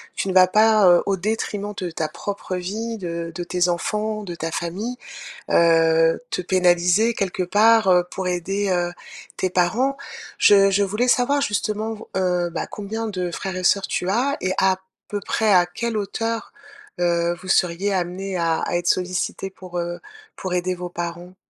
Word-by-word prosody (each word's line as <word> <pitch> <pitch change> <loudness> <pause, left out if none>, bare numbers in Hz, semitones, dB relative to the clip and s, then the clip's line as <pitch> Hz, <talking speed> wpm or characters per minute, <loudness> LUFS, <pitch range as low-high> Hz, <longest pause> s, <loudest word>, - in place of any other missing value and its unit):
tu - - -2
ne - - -1
vas 185 0 +7
pas, 215 0 +5
heu, 175 -1 +6
au 200 - +1
détriment 205 +1 -3
de 180 -2 -4
ta 160 -1 -2
propre 190 +4 -5
vie, 215 +6 -4
de 170 -3 -5
de 175 - -3
tes 180 0 0
enfants, 215 +5 -2
de 180 -4 -6
ta 165 -1 -4
famille, 200 +10 -4 0.5
heu, 165 -1 +4
te - - -2
pénaliser 180 +4 +3
quelque 190 -3 -2
part, 215 +3 +4
heu, 180 -1 +5
pour 190 -1 -3
aider, 195 +3 -1
heu, 175 -1 0 0.5
tes 185 - +1
parents. 225 +11 +1 0.4
Je 195 -1 +6
je 200 +1 +2
voulais 210 +5 0
savoir 255 +4 +3
justement 215 -3 -1
vau 220 - -12
heu, 180 -2 0
bah 170 - -4
combien 220 +2 -5
de 180 -4 -3
frères 170 - -6
et 185 - -3
sœurs 195 +2 +3
tu 180 - -2
as? 255 +8 +1
Et 185 - 0
à 190 -1 +3 0.3
peu 205 - -3
près 215 +2 +1
à 180 -2 +5
quelle 230 +6 -3
hauteur, 225 +2 -3 0.5
heu, 170 0 +1
vous 185 - -10
seriez 185 +2 +1
amenés 185 +1 -2
à 165 -2 +1
à - - -1
être 175 0 -3
sollicités 185 +1 -1
pour, 185 -2 -8
heu, 175 0 -4 0.4
pour 185 -1 -4
aider 180 +1 0
vos 180 0 -6
parents? 175 +1 -6
185 Hz, 180 wpm, -22 LUFS, 175-210 Hz, 0.5 s, vas